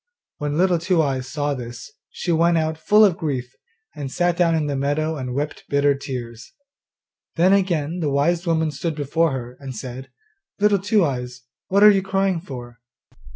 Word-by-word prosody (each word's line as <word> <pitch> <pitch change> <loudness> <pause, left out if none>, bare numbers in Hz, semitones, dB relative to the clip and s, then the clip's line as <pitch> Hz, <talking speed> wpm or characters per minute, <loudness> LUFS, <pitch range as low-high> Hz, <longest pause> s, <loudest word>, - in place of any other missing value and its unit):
When 150 0 -2
Little 180 -1 +3
Two 170 +1 +1
eyes 135 -4 0
saw 145 0 -1
this, 120 +1 -8 0.2
she 175 - -3
went 170 +1 +3
out 160 0 0
full 210 +7 +5
of 180 -4 +1
grief, 130 -7 -3 0.4
and 140 -3 -5
sat 175 +2 +1
down 170 -2 +2
in 155 -2 0
the 145 -1 -2
meadow 145 +4 -1
and 125 -3 -5
wept 145 +2 -4
bitter 140 0 +3
tears. 120 -5 -7 0.8
Then 180 +3 +4
again 175 -4 0
the 155 -4 0
wise 165 +6 +1
woman 160 -2 +1
stood 165 +1 -3
before 155 +2 +1
her, 125 -1 -6
and 135 -2 -7
said, 130 +3 -7 0.5
'Little 205 -1 +3
Two 205 -1 +2
eyes, 125 -3 -4 0.3
what 200 +2 +3
are 210 - +10
you 195 -1 +2
crying 195 -2 0
for? 120 -7 -9
155 Hz, 180 wpm, -22 LUFS, 135-175 Hz, 0.8 s, are